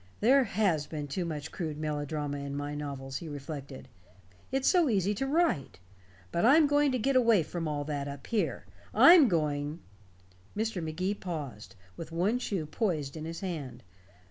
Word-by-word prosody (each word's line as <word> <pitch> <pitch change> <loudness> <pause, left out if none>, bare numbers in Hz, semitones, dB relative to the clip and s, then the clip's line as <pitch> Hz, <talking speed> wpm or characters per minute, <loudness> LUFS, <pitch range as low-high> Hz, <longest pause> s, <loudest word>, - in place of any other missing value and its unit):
"There 260 +4 +5
has 180 -8 +1
been 150 -2 -5
too 175 +6 -3
much 150 -4 -5
crude 155 -5 -4
melodrama 150 -1 -3
in 140 0 -5
my 145 0 -4
novels," 140 -2 -5
he 165 - -7
reflected. 140 -1 -7 0.6
"It's 270 0 0
so 350 -6 +4
easy 200 -2 +1
to 270 +7 -2
write. 315 - +1 0.5
But 170 - 0
I'm 295 +7 +6
going 290 0 +3
to - - +2
get 265 +4 0
away 230 -8 +5
from 165 +1 -4
all 145 -1 -2
that 145 -1 -3
up 140 -1 -8
here. 225 -3 -1 0.3
I'm 335 -5 +9
going 150 -3 -1 0.4
" 90 - -22
Mr. 220 -5 -1
Magee 175 +5 -2
paused, 150 - -7 0.2
with 165 -1 -7
one 190 +9 +1
shoe 195 -9 -2
poised 155 - -2
in 155 0 -6
his 165 +3 -6
hand. 165 -9 -5
160 Hz, 170 wpm, -30 LUFS, 145-215 Hz, 0.6 s, I'm